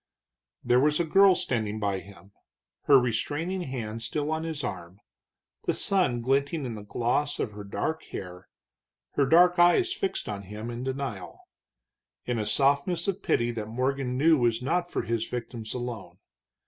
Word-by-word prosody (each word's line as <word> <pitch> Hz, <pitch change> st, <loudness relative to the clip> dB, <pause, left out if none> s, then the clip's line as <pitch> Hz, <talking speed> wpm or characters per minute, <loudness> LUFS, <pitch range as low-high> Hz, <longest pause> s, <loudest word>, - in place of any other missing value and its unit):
There 125 Hz, +1 st, +4 dB
was 150 Hz, +3 st, +3 dB
a -, -, +3 dB
girl 195 Hz, +3 st, +6 dB
standing 110 Hz, -7 st, -2 dB
by 100 Hz, -2 st, -1 dB
him, 95 Hz, 0 st, -15 dB, 0.5 s
her 140 Hz, -, +7 dB
restraining 145 Hz, -, -1 dB
hand 115 Hz, -7 st, -5 dB
still 145 Hz, +7 st, -2 dB
on 160 Hz, +1 st, -2 dB
his 155 Hz, -3 st, -4 dB
arm, 95 Hz, -4 st, -6 dB, 0.7 s
the -, -, +1 dB
sun 180 Hz, -12 st, +1 dB
glinting 140 Hz, +4 st, +1 dB
in 120 Hz, -, -4 dB
the 105 Hz, -, -7 dB
gloss 120 Hz, +7 st, -1 dB
of 110 Hz, -, -1 dB
her 105 Hz, 0 st, -8 dB
dark 155 Hz, +10 st, -3 dB
hair, 90 Hz, 0 st, -8 dB, 0.6 s
her 140 Hz, -, +1 dB
dark 175 Hz, +4 st, +5 dB
eyes 355 Hz, -, +5 dB
fixed 390 Hz, -1 st, -3 dB
on 100 Hz, -2 st, -4 dB
him 105 Hz, +4 st, -7 dB
in 120 Hz, +1 st, -5 dB
denial, 130 Hz, -7 st, -5 dB, 0.8 s
in 120 Hz, -2 st, -1 dB
a 105 Hz, -, -2 dB
softness 140 Hz, -, +2 dB
of 195 Hz, -1 st, -1 dB
pity 120 Hz, 0 st, +1 dB
that 110 Hz, -2 st, -5 dB
Morgan 130 Hz, +2 st, -1 dB
knew 155 Hz, +2 st, +5 dB
was 120 Hz, -2 st, +2 dB
not 175 Hz, +8 st, -1 dB
for -, -, -2 dB
his 115 Hz, 0 st, -1 dB
victims 115 Hz, -2 st, -5 dB
alone. 115 Hz, -8 st, -6 dB
125 Hz, 165 wpm, -27 LUFS, 110-155 Hz, 0.8 s, her